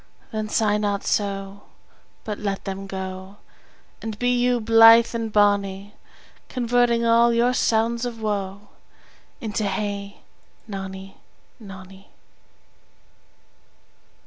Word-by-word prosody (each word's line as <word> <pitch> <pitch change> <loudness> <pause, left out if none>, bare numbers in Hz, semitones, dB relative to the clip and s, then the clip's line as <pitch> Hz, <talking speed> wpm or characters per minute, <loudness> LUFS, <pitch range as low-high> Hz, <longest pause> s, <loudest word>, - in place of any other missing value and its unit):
Then 215 -1 -3
sigh 210 -1 +1
not 205 -1 -1
so, 200 -1 -2 0.6
But 210 -2 -5
let 200 -2 -3
them 195 0 -5
go, 190 +1 -7 0.6
And 220 -2 -5
be 245 +2 +1
you 245 0 +2
blithe 225 +1 +6
and 230 -1 -3
bonny, 205 -1 +1 0.6
Converting 240 -1 +1
all 230 +1 +4
your 235 +2 +2
sounds 230 0 +1
of 240 -2 -4
woe 205 -1 -4 0.7
Into. 220 -2 -2
Hey, 200 0 -4 0.5
nonny, 195 -1 -8 0.4
nonny. 195 -1 -13
210 Hz, 100 wpm, -23 LUFS, 195-230 Hz, 0.7 s, blithe